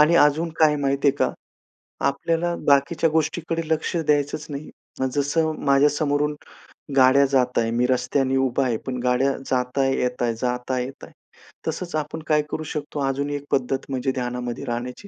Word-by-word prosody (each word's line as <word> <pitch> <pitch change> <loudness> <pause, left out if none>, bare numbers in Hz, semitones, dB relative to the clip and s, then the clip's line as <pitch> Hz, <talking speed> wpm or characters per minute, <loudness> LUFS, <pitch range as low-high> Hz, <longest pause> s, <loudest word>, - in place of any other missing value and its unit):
आणि 155 +3 +6
अजून 155 +2 +4
काय 155 -2 +5
माहिती 140 0 +1
आहे 135 - +1
का, - - +1 0.8
आपल्याला 165 +4 0
बाकीच्या 145 +4 +3
गोष्टीकडे 160 +1 -1
लक्ष 160 +3 0
द्यायचंच 150 -1 0
नाही. 145 +1 -6 0.4
जसं 150 +3 +1
माझ्या 140 +1 +5
समोरून, 150 0 0 0.6
गाड्या 130 +1 +6
जात 130 -2 +1
आहे 115 -1 +1
मी 120 +2 +1
रस्त्याने 130 +1 +1
उभा 130 0 +1
आहे, 120 -3 0
पण 130 -1 -3
गाड्या 125 +2 +2 0.2
जात 125 +1 0
आहे, 135 0 +2
येत 125 0 -1
आहे, 120 -1 +1
जात 125 0 -2
आहे, 125 -1 0
येत 135 +2 -9
आहे. - - -14 0.6
तसंच 170 +1 -3
आपण 155 +1 -3
काय 150 -1 +3
करू 155 - -3
शकतो 150 0 -4
अजून 140 +2 -1
एक 145 -1 -3
पद्धत 135 0 0
म्हणजे 130 0 -1
ध्यानामध्ये 125 0 -4
राहण्याची, 125 +8 -5
140 Hz, 170 wpm, -23 LUFS, 125-150 Hz, 0.8 s, आणि